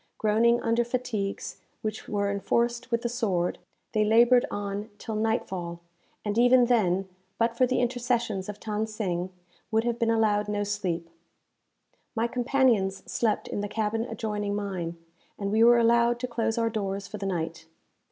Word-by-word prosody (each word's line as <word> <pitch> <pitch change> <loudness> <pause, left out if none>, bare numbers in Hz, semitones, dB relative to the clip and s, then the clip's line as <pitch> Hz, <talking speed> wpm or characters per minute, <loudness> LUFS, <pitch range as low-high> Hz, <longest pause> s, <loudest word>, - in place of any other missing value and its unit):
Groaning 230 +3 +3
under 230 +1 +2
fatigues, 235 -5 -3 0.3
which 215 0 -4
were 200 -1 0
enforced 235 +4 0
with 235 0 0
the - - +1
sword, 200 -8 -1 0.3
they 215 -2 +2
laboured 235 +3 +5
on 205 +1 -4
till 220 - -6
night 220 +2 0
fall, 170 -2 -5 0.5
and 210 +2 0
even 245 0 +6
then, 195 -6 +2 0.3
but 230 0 +1
for 255 +1 +3
the 255 - +1
intercessions 240 -5 -1
of 210 0 -6
Than 215 0 -2
Sing, 185 -4 -3 0.4
would 220 0 +2
have 235 0 -1
been 230 -2 +2
allowed 215 -2 +2
no 205 0 -1
sleep. 190 -5 -2 1.1
My 225 0 +1
companions 240 -6 +1
slept 225 -3 0
in - - -3
the 205 - -2
cabin 220 +1 -1
adjoining 210 -3 -3
mine, 185 -5 -3 0.4
and 200 -1 -2
we 220 +2 +4
were 240 +1 +7
allowed 235 +1 +4
to 250 - -1
close 230 -1 -1
our 230 -1 +1
doors 200 -2 -3
for 210 - -7
the 195 - -3
night. 165 -2 -3
220 Hz, 165 wpm, -27 LUFS, 200-235 Hz, 1.1 s, were